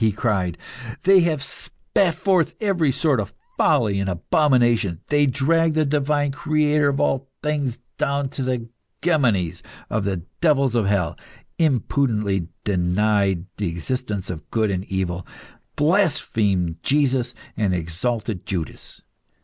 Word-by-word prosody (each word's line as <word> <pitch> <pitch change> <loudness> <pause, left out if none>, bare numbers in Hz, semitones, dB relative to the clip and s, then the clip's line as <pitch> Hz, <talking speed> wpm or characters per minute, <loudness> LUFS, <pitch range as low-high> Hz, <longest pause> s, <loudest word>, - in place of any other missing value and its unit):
he 110 -1 +4
cried. 95 -5 -1 0.5
"They 190 0 +7
have 160 -5 +1
spat 175 -5 -1
forth 180 -2 +1
every 180 -9 +2
sort 140 -1 +1
of 105 - -4 0.2
folly 115 - +2
and 100 0 -1
abomination. 120 - +2
They 145 -1 +3
dragged 155 +5 +2
the 155 -1 +3
Divine 145 0 +1
Creator 150 -1 +2
of 140 0 -1
all 135 0 0
things 145 -5 -1 0.2
down 140 -1 0
the 125 -3 -2 0.4
gemonies(*) 115 - +1 0.3
of 105 -1 0
the 95 -4 -2 0.2
devils 140 -6 +3
of 115 -4 +1
hell, 95 -5 +1 0.4
impudently 115 - +1 0.2
denied 95 0 +1
the 100 - -1
existence 100 +2 -3
of 80 -3 -9
Good 110 -3 +1
and 95 0 -2
Evil, 95 -2 -2 0.5
blasphemed 110 - +1
Jesus, 130 -4 +1 0.2
and 105 -4 +1
exalted 90 +4 -2
Judas. 85 -5 -5
125 Hz, 125 wpm, -22 LUFS, 95-150 Hz, 0.5 s, They